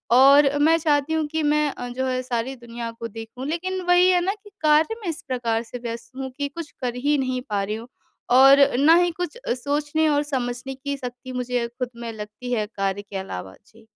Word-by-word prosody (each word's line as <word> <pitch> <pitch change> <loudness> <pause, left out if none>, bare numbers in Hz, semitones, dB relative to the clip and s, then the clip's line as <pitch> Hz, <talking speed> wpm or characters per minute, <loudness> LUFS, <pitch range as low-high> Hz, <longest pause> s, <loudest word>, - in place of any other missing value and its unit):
और 275 +2 +7
मैं 320 +3 +5
चाहती 295 -1 +1
हूँ 320 -1 +1
कि 315 +1 -2
मैं 300 0 +2
अ, 245 - -7
जो 255 +2 -2
है 255 0 -1
सारी 250 +1 -2
दुनिया 235 -1 -7
को 230 0 -7
देखूँ 225 +4 -8
लेकिन 370 +4 -2
वही 355 +1 +6
है 360 -1 +4
ना 390 - +1
कि 415 - -14
कार्य 310 +7 +4
में 400 - -6
इस 330 +1 -4
प्रकार 235 -3 -1
से 240 - -8
व्यस्त 230 0 -6
हूँ 265 0 -4
कि 285 -1 -1
कुछ 300 +2 -8
कर 245 -1 -2
ही 290 +4 +1
नहीं 255 -2 -1
पा 200 -2 0
रही 210 +2 -2
हूँ। 225 +2 -8 0.4
और 270 +2 +8 0.2
ना 300 +5 +6
ही 350 0 +3
कुछ 355 +3 -5
अ, - - -2
सोचने 290 +4 0
और 290 -1 +2
समझने 260 -2 -3
की 280 +1 -4
शक्ति 250 0 -7
मुझे 250 -1 -1
खुद 245 +1 -5
में 235 -1 -6
लगती 215 +3 -7
है 215 -3 0
कार्य 195 0 -1
के 205 -1 -7
अलावा, 95 - -6
जी। 225 0 -21
260 Hz, 225 wpm, -23 LUFS, 235-300 Hz, 0.4 s, और